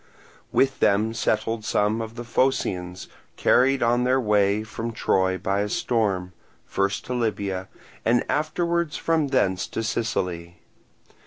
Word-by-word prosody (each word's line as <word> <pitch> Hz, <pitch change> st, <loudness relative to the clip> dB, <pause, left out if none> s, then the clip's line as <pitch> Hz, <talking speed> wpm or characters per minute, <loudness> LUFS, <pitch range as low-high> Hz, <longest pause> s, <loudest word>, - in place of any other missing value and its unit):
With 135 Hz, 0 st, +2 dB
them 105 Hz, +3 st, +2 dB
settled 110 Hz, 0 st, -1 dB
some 105 Hz, +1 st, +1 dB
of 110 Hz, 0 st, -6 dB
the 120 Hz, -, -6 dB
Phocians 95 Hz, -8 st, -1 dB, 0.3 s
carried 135 Hz, +1 st, +3 dB
on 120 Hz, +1 st, +2 dB
their 130 Hz, +1 st, +3 dB
way 105 Hz, -2 st, +2 dB
from 115 Hz, +1 st, -5 dB
Troy 95 Hz, -3 st, +1 dB
by 95 Hz, +2 st, -1 dB
a 105 Hz, +1 st, -1 dB
storm, 100 Hz, -7 st, 0 dB, 0.3 s
first 100 Hz, +1 st, -1 dB
to 125 Hz, -, -4 dB
Libya, 100 Hz, -6 st, -2 dB, 0.4 s
and 120 Hz, +1 st, +2 dB
afterwards 170 Hz, +1 st, 0 dB
from 160 Hz, -3 st, +1 dB
thence 95 Hz, -9 st, +1 dB
to 115 Hz, -, -4 dB
Sicily. 90 Hz, -7 st, -2 dB
110 Hz, 135 wpm, -24 LUFS, 100-125 Hz, 0.4 s, carried